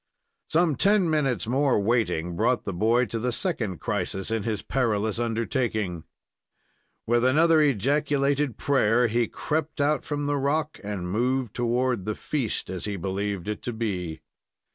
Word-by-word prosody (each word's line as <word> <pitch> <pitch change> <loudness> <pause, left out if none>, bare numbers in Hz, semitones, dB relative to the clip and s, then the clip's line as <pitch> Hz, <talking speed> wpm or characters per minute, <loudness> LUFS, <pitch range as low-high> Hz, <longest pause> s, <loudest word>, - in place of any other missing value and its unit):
Some 160 -4 +2
ten 200 0 +4
minutes' 135 -7 +1
more 130 +1 +2
waiting 95 -6 0
brought 120 +6 +1
the 100 - -3
boy 115 +7 +2
to 115 0 -4
the 125 +2 -1
second 115 - -2
crisis 95 +3 -2
in 115 -1 0
his 110 -1 -3
perilous 110 -4 0
undertaking. 115 - -1 1.0
With 120 +1 +2
another 155 +5 +5
ejaculated 140 +1 +1
prayer 125 -4 +3
he 120 +1 +1
crept 155 0 -3
out 150 +1 +2
from 145 -1 -3
the 145 0 0
rock, 150 +3 -1
and 95 -4 -4
moved 125 +2 0
toward 120 -3 0
the 105 - -2
"feast," 135 -8 -3
as 95 -2 -5
he 105 -1 -3
believed 95 0 -3
it 105 -1 -3
to 120 - -4
be. 90 -8 -3
120 Hz, 150 wpm, -26 LUFS, 105-140 Hz, 1.0 s, another